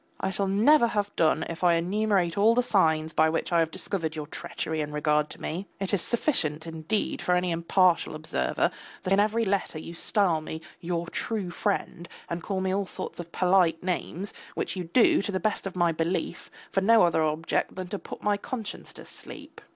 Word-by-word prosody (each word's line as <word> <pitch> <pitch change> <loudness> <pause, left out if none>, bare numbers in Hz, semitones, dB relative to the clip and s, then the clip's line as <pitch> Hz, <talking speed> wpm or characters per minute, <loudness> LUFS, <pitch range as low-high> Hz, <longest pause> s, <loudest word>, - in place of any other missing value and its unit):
I - - -1
shall 195 0 -1
never 235 +7 +5
have 205 -2 -2
done 160 -2 +2
if 165 +2 -6
I 175 -1 +5
enumerate 185 0 +1
all 220 +3 +4
the 250 - +3
signs 160 -7 +2
by 160 0 +4
which 165 - -2
I 170 - +5
have 165 -1 +2
discovered 160 -2 -3
your 155 -1 -4
treachery 155 +1 -4
in 150 0 -4
regard 150 0 +1
to - - -10
me. 185 +5 -4
It 195 +1 -2
is 195 - +2
sufficient, 165 - 0
indeed, 165 +6 -2
for 180 - +2
any 180 0 +1
impartial 170 0 +2
observer 155 +2 0 0.3
that 190 - +1
in 195 - +4
every 215 +2 +2
letter 195 -5 -1
you 165 +2 -7
style 175 -2 +1
me, 160 +1 -6 0.2
your 170 0 -2
true 195 +1 -3
friend, 180 -3 -2 0.2
and 170 0 -2
call 190 +2 -2
me 190 0 0
all 195 0 -1
sorts - - -5
of 170 -1 -7
polite 180 -3 +3
names, 185 +1 -3 0.2
which - - -2
you 180 -2 -4
do, 210 +7 +4
to 205 - -3
the 190 - -1
best 215 -1 -1
of 190 - -7
my 175 -2 +3
belief, 165 +3 -2 0.2
for 195 - +1
no 225 +2 +6
other 170 -2 +3
object 155 +1 0
than 185 -1 -5
to 205 0 -3
put - - -9
my 205 -1 +2
conscience 220 0 -6
to - - -11
sleep. - - -9
180 Hz, 205 wpm, -27 LUFS, 165-200 Hz, 0.3 s, no